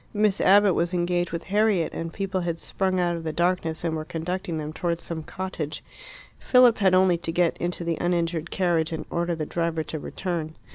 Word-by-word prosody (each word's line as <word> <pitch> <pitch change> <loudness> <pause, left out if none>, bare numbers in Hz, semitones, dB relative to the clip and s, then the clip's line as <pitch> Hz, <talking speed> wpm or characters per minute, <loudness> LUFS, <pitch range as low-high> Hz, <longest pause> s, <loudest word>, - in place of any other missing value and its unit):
Miss 210 -2 +2
Abbott 200 0 +6
was 175 +2 0
engaged 175 0 0
with 170 - -4
Harriet, 205 -4 +1
and 165 0 -4
people 190 0 -2
had 170 -1 -2
sprung 185 +2 -1
out 175 -1 +1
of 165 - -6
the 160 - -2
darkness 170 -1 0
and 165 -2 -1
were 155 - -3
conducting 170 +2 -4
them 155 0 -5
towards 170 0 -2
some 165 -1 -4
cottage. 160 -3 -5 0.6
Philip 250 -3 +5
had 190 -2 +4
only 185 -2 +4
to 165 - -4
get 170 0 +2
into 175 0 -3
the 170 -1 -2
uninjured 170 -2 0
carriage 170 -3 +1
and 160 - -4
order 170 0 0
the 155 -1 -3
driver 165 0 -1
to 155 +1 -5
return. 165 -2 -4
175 Hz, 200 wpm, -25 LUFS, 165-185 Hz, 0.6 s, Abbott